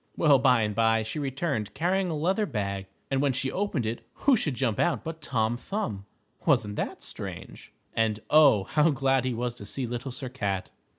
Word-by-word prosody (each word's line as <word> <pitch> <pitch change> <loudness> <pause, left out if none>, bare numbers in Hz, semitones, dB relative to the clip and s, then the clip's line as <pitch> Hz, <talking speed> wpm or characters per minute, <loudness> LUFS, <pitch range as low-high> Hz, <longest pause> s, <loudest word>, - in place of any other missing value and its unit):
Well, 145 -4 +5
by 125 -3 +4
and 105 0 -1
by, 115 0 +3
she 110 +7 -4
returned 140 -5 -2
carrying 180 +4 +1
a 160 - -2
leather 190 +8 +1
bag, 100 - -3 0.2
and 135 0 +2
when 140 -2 +2
she 130 +1 -1
opened 185 - -1
it, 115 +2 -3
who 275 -2 +3
should 150 - -1
jump 120 -5 0
out 175 - +1
but 160 0 -6
Tom 115 -4 0
Thumb. 110 - -4 0.4
Wasn't 115 -9 +2
that - - -3
strange? - - -8 0.2
And, 110 -1 +1
oh, 145 -10 +6
how 150 +10 +3
glad 135 -3 +2
he 130 - 0
was 120 +1 -2
to 100 - -8
see 135 +2 -3
Little 120 +2 -4
Sir 130 +1 -5
Cat. 100 -7 -3
130 Hz, 195 wpm, -27 LUFS, 110-150 Hz, 0.4 s, oh